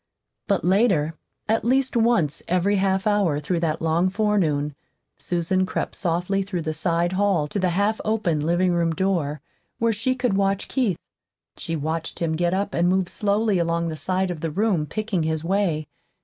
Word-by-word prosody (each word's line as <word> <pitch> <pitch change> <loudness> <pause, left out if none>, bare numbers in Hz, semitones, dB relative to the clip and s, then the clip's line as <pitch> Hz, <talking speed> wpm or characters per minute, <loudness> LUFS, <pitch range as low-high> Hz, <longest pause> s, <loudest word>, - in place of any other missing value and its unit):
But - - +1
later, 185 -5 +3 0.3
at 225 +1 +1
least 265 +2 +2
once 225 -11 +2
every 185 +3 +2
half 190 +1 +1
hour 200 -8 +2
through 170 +4 -1
that 160 -1 -1
long 165 +3 +2
forenoon, 185 -8 +1 0.5
Susan 180 +2 0
crept 185 - -3
softly 180 +2 -1
through 190 -3 -3
the 155 -1 -2
side 170 +1 0
hall 190 -5 +2
to 200 - -3
the 185 -1 +2
half 200 +5 0
open 215 -8 0
living 175 +4 +2
room 170 -1 +1
door, 155 -6 -1 0.4
where 230 0 +2
she 255 +5 0
could 250 -4 0
watch 195 0 0
Keith. 230 - 0 0.6
She 165 - -4
watched 160 +2 -3
him 165 -2 -1
get 170 +2 +1
up 200 +1 -2
and 175 +1 +2
move 185 -1 +1
slowly 210 -1 +1
along 170 0 0
the 160 - -4
side 185 +4 -1
of 170 - -5
the 165 - -1
room, 185 -2 0
picking 215 -3 -2
his 160 0 -1
way. 170 -4 0
180 Hz, 175 wpm, -23 LUFS, 165-205 Hz, 0.6 s, later